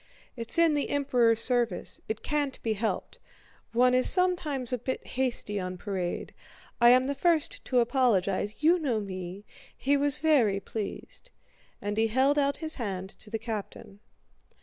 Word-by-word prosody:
"It's 230 +2 -1
in 335 -2 +4
the 290 -1 -1
Emperor's 245 -5 +2
service... 240 -7 0
it 220 0 -4
can't 290 -3 -1
be 225 - 0
helped... 215 +1 -3 0.5
one 250 +2 +3
is 255 0 +7
sometimes 310 -9 +1
a 250 - -1
bit 260 +3 -4
hasty 245 -5 -1
on 185 -1 -5
parade... 185 -2 -4 0.5
I 240 - +8
am 255 +1 +6
the 275 +2 -2
first 320 +2 +1
to 250 -2 +2
apologize, 220 -3 0
you 340 +3 +5
know 255 -8 -1
me!... 190 0 -7 0.3
He 280 +2 +1
was 285 +1 +3
very 250 -11 +2
pleased!" 220 - -7 0.5
And 205 +1 -3
he 225 0 +3
held 265 +6 +2
out 280 0 +1
his 315 -1 -4
hand 190 -3 -4
to 215 - -13
the 225 - -2
captain. 215 -3 -7
245 Hz, 160 wpm, -28 LUFS, 210-280 Hz, 0.5 s, I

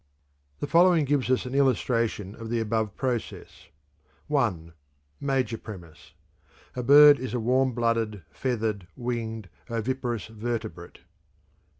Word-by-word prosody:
"_) - - -37
The - - 0
following 170 0 +4
gives 140 -2 0
us 130 0 +1
an 125 - -6
illustration 115 -7 +1
of 115 0 -9
the 120 0 0
above 110 -2 -1
process: 125 -4 -4 0.7
I. 95 - 0 0.5
(Major 130 -5 -1
premise) 90 -8 -12 0.6
A 125 - -2
bird 145 +3 +8
is 125 -2 -4
a - - 0
warm 130 +3 +2
blooded, 115 -4 -1
feathered, 110 -7 -2
winged, 115 -4 -4 0.2
oviparous 120 -1 -2
vertebrate. 110 -5 -6
120 Hz, 120 wpm, -26 LUFS, 110-130 Hz, 0.7 s, bird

